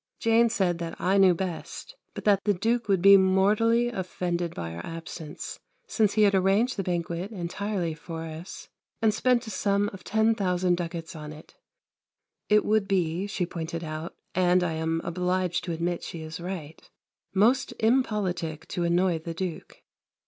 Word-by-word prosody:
Jane 230 Hz, +1 st, +4 dB
said 185 Hz, -6 st, 0 dB
that 170 Hz, -1 st, -5 dB
I 195 Hz, +2 st, +2 dB
knew 185 Hz, -2 st, +6 dB
best, 185 Hz, -, -5 dB, 0.2 s
but -, -, -6 dB
that 200 Hz, -2 st, +3 dB
the 205 Hz, -1 st, +2 dB
Duke 230 Hz, +5 st, 0 dB
would 190 Hz, -3 st, +2 dB
be 200 Hz, 0 st, +9 dB
mortally 210 Hz, +5 st, +3 dB
offended 180 Hz, -4 st, -3 dB
by 85 Hz, -1 st, -5 dB
our 85 Hz, -, -7 dB
absence, 165 Hz, -2 st, -7 dB, 0.3 s
since 215 Hz, -3 st, +1 dB
he 215 Hz, -, +4 dB
had 200 Hz, -1 st, +5 dB
arranged 195 Hz, +6 st, +3 dB
the 195 Hz, -, -1 dB
banquet 175 Hz, 0 st, -2 dB
entirely 185 Hz, -2 st, -3 dB
for 160 Hz, +1 st, -7 dB
us 165 Hz, +3 st, -8 dB, 0.3 s
and 220 Hz, -2 st, +3 dB
spent 250 Hz, +1 st, +2 dB
a 220 Hz, -, -6 dB
sum 200 Hz, 0 st, +1 dB
of 190 Hz, -, -10 dB
10,000 195 Hz, -5 st, +2 dB
ducats 170 Hz, -1 st, -5 dB
on 150 Hz, -1 st, -7 dB
it. 155 Hz, 0 st, -13 dB, 1.0 s
It 210 Hz, 0 st, +4 dB
would 215 Hz, -2 st, +2 dB
be, 180 Hz, 0 st, 0 dB
she 200 Hz, -3 st, -1 dB
pointed 170 Hz, -1 st, -5 dB
out 155 Hz, +1 st, -6 dB, 0.2 s
and 180 Hz, 0 st, +3 dB
I 175 Hz, -, 0 dB
am 160 Hz, +1 st, -1 dB
obliged 180 Hz, +1 st, -1 dB
to 175 Hz, -, -3 dB
admit 170 Hz, +1 st, -2 dB
she 165 Hz, -2 st, -7 dB
is 160 Hz, +1 st, -7 dB
right 170 Hz, -4 st, -6 dB, 0.5 s
most 240 Hz, +7 st, +3 dB
impolitic 200 Hz, -, 0 dB
to 175 Hz, -, -2 dB
annoy 170 Hz, 0 st, +2 dB
the 165 Hz, +1 st, -6 dB
Duke. 180 Hz, -1 st, -6 dB
180 Hz, 165 wpm, -27 LUFS, 165-205 Hz, 1.0 s, be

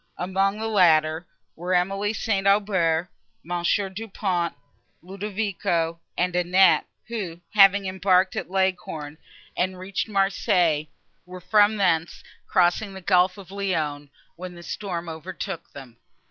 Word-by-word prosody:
Among 195 Hz, +3 st, 0 dB
the 220 Hz, -, -4 dB
latter, 165 Hz, -5 st, +3 dB, 0.3 s
were 180 Hz, +2 st, -1 dB
Emily 195 Hz, +3 st, 0 dB
St. 200 Hz, -3 st, -1 dB
Aubert, 185 Hz, -5 st, +2 dB, 0.3 s
Monsieur 175 Hz, +4 st, 0 dB
Du 205 Hz, +4 st, -7 dB
Pont, 180 Hz, -4 st, -1 dB, 0.5 s
Ludovico 190 Hz, -4 st, -2 dB, 0.2 s
and 180 Hz, 0 st, 0 dB
Annette, 180 Hz, +2 st, +4 dB, 0.2 s
who, 195 Hz, -8 st, -5 dB
having 200 Hz, -1 st, +6 dB
embarked 185 Hz, 0 st, +2 dB
at -, -, -4 dB
Leghorn 180 Hz, -5 st, -2 dB, 0.4 s
and 185 Hz, +1 st, -1 dB
reached 185 Hz, +3 st, -3 dB
Marseilles, 185 Hz, -6 st, +1 dB, 0.4 s
were 180 Hz, 0 st, -9 dB
from 210 Hz, +3 st, +3 dB
thence 170 Hz, -4 st, 0 dB, 0.2 s
crossing 185 Hz, +3 st, +1 dB
the 190 Hz, -, -8 dB
Gulf 180 Hz, +1 st, +3 dB
of 190 Hz, -2 st, -12 dB
Lyons, 155 Hz, -8 st, -2 dB, 0.3 s
when 180 Hz, 0 st, -8 dB
this 170 Hz, 0 st, -12 dB
storm 175 Hz, -4 st, -4 dB
overtook 170 Hz, +2 st, -6 dB
them. 130 Hz, -4 st, -12 dB
185 Hz, 125 wpm, -24 LUFS, 170-195 Hz, 0.5 s, having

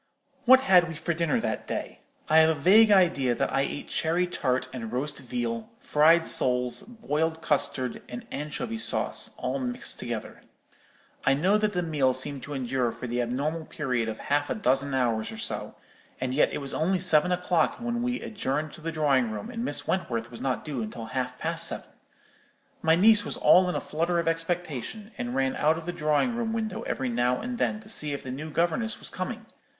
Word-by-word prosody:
"What 260 Hz, +1 st, +8 dB
had 180 Hz, -9 st, +5 dB
we 165 Hz, -, -6 dB
for 170 Hz, +3 st, -2 dB
dinner 165 Hz, -3 st, +1 dB
that -, -, -3 dB
day? -, -, -4 dB, 0.3 s
I 155 Hz, -, +4 dB
have 160 Hz, 0 st, +6 dB
a 160 Hz, -, +2 dB
vague 215 Hz, +8 st, +6 dB
idea 170 Hz, -11 st, +4 dB
that -, -, -1 dB
I 135 Hz, -, +3 dB
ate 140 Hz, +1 st, -4 dB
cherry 170 Hz, +3 st, +1 dB
tart 130 Hz, -7 st, -1 dB
and 115 Hz, -4 st, -5 dB
roast 135 Hz, +5 st, -2 dB
veal, 120 Hz, -3 st, -3 dB
fried 165 Hz, +3 st, +4 dB
soles, 125 Hz, -1 st, 0 dB
boiled 160 Hz, -8 st, -2 dB
custard, 140 Hz, -4 st, -1 dB
and 120 Hz, -, -7 dB
anchovy 150 Hz, +10 st, -4 dB
sauce, -, -, +1 dB
all -, -, -2 dB
mixed 250 Hz, -1 st, -3 dB
together. 120 Hz, -3 st, -5 dB, 0.8 s
I 135 Hz, -, +4 dB
know 190 Hz, +9 st, +3 dB
that 215 Hz, -1 st, +1 dB
the 180 Hz, -1 st, 0 dB
meal 140 Hz, -6 st, +1 dB
seemed 135 Hz, +1 st, -3 dB
to 145 Hz, -, -6 dB
endure 125 Hz, -2 st, 0 dB
for -, -, -8 dB
the 120 Hz, 0 st, -1 dB
abnormal 145 Hz, +7 st, -2 dB
period 125 Hz, -8 st, -2 dB
of 110 Hz, -, -5 dB
half 145 Hz, +1 st, 0 dB
a -, -, -1 dB
dozen 135 Hz, -, +1 dB
hours 115 Hz, -4 st, 0 dB
or -, -, -8 dB
so; -, -, -4 dB, 0.4 s
and 130 Hz, 0 st, -2 dB
yet 145 Hz, -, +3 dB
it -, -, -3 dB
was 140 Hz, -, -3 dB
only 185 Hz, +4 st, +1 dB
seven 180 Hz, -1 st, +4 dB
o'clock 180 Hz, -1 st, +1 dB
when 235 Hz, 0 st, -2 dB
we 245 Hz, +1 st, -1 dB
adjourned 155 Hz, -7 st, -3 dB
to -, -, -12 dB
the 165 Hz, +1 st, -3 dB
drawing 140 Hz, -6 st, +2 dB
room, 215 Hz, -, -6 dB
and 230 Hz, -1 st, -4 dB
Miss -, -, -1 dB
Wentworth 115 Hz, -11 st, -2 dB
was 115 Hz, -, -8 dB
not 130 Hz, -2 st, -2 dB
due 140 Hz, -6 st, -3 dB
until 110 Hz, +1 st, -6 dB
half 125 Hz, -1 st, -2 dB
past 165 Hz, +1 st, -2 dB
seven. -, -, -6 dB, 0.9 s
My 160 Hz, 0 st, +4 dB
niece 210 Hz, +3 st, +6 dB
was -, -, -3 dB
all 180 Hz, 0 st, +5 dB
in -, -, -2 dB
a -, -, +1 dB
flutter 170 Hz, +3 st, -1 dB
of 170 Hz, -1 st, 0 dB
expectation, 165 Hz, -, -3 dB
and 120 Hz, +1 st, -3 dB
ran 135 Hz, 0 st, +1 dB
out 155 Hz, +2 st, +3 dB
of 165 Hz, -, -7 dB
the 175 Hz, -, -3 dB
drawing 155 Hz, -, +1 dB
room 230 Hz, -1 st, -2 dB
window 225 Hz, 0 st, -3 dB
every 130 Hz, -1 st, -2 dB
now 120 Hz, +1 st, +1 dB
and 245 Hz, +1 st, -5 dB
then 215 Hz, -, 0 dB
to 215 Hz, -, -15 dB
see 150 Hz, -9 st, 0 dB
if 140 Hz, -, -5 dB
the 130 Hz, -, -5 dB
new 150 Hz, +5 st, -5 dB
governess 175 Hz, +8 st, 0 dB
was -, -, -8 dB
coming. 220 Hz, +5 st, -5 dB
155 Hz, 205 wpm, -27 LUFS, 130-180 Hz, 0.9 s, What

